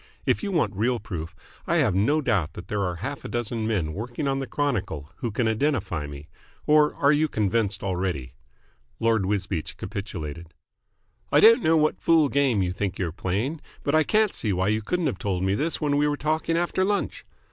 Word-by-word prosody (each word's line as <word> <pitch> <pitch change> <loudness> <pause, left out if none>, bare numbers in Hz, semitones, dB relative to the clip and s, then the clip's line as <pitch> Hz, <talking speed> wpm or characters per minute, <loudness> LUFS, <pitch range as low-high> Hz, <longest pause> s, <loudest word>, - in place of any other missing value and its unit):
If - - +2
you 205 -3 -3
want 120 - +1
real 120 +4 +1
proof, 80 -5 -6 0.3
I 170 - +2
have 130 - +3
no 135 +12 +2
doubt 95 - 0
that 85 - -10
there 105 -1 -1
are 90 -2 -1
half 145 - -5
a - - -5
dozen 115 -2 -2
men 90 -9 -1
working 120 - -4
on 135 0 0
the 135 - -4
Chronicle 105 - -2
who 120 - -3
can 115 +2 0
identify 110 - 0
me. 70 +1 -9 0.4
Or 150 0 +4
are 140 0 +4
you 150 +1 +3
convinced 105 -4 0
already?" 90 -10 -2 0.7
Lord 110 -4 +2
Wisbeach 95 -5 -2
capitulated. 85 -4 -6 0.8
"I - - +6
don't 230 +1 +7
know 160 -1 +4
what 155 0 +1
fool 160 -3 +4
game 130 -8 +2
you 90 0 -1
think 100 0 -3
you're 90 -4 -2
playing, 110 - -2 0.2
but 145 - 0
I 155 - +5
can't 215 +6 +2
see 105 - -2
why 95 +1 +1
you 110 +1 +1
couldn't 175 +10 -1
have 125 -11 -1
told 95 -2 -1
me 95 0 +2
this 155 +10 -1
when 145 -2 +1
we 145 +1 +3
were 145 0 0
talking 155 +2 0
after 175 +2 +1
lunch." 200 +1 -1
110 Hz, 200 wpm, -25 LUFS, 95-150 Hz, 0.8 s, don't